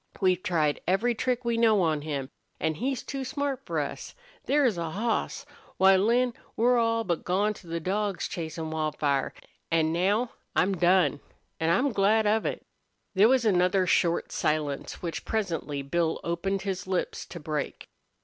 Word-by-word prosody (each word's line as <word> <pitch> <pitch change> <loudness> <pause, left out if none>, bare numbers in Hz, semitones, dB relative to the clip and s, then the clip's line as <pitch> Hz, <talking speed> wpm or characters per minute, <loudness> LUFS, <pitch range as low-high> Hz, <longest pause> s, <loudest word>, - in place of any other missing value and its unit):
We've 185 -2 +2
tried 160 -7 0
every 215 +7 +2
trick 250 +1 -1
we 235 -1 +1
know 220 -4 +4
on 155 -3 +1
him. 140 -3 -4 0.3
An' 160 0 0
he's 255 - -2
too 275 -1 -4
smart 280 0 -3
for - - -1
us. - - -5 0.3
There's 275 -7 +3
a 170 -1 -3
hoss! 225 - -2 0.3
Why, 190 0 +6
Lin, 235 +5 +2 0.2
we're 240 +2 +4
all 230 0 +1
but 175 -5 -2
gone 200 +4 +1
to 185 - -15
the 165 0 -3
dogs 195 +3 -1
chasin' 160 -1 -5
Wildfire. 150 -3 0 0.4
An' 160 -1 +2
now 205 +8 +1 0.2
I'm 195 +1 +2
done, 180 -3 +3 0.4
an' 160 0 +1
I'm 255 +11 +3
glad 215 +2 +3
of 215 +1 +2
it." - - -4 0.5
There 200 +3 +5
was 260 -2 +3
another 185 -1 +3
short 170 -1 +1
silence, 150 -1 -2
which 170 -2 -4
presently 165 -9 -2
Bill 160 +3 0
opened 190 +3 -2
his 190 -2 -3
lips 185 -1 -2
to 170 - -8
break. 150 -1 -4
190 Hz, 165 wpm, -27 LUFS, 165-225 Hz, 0.5 s, Why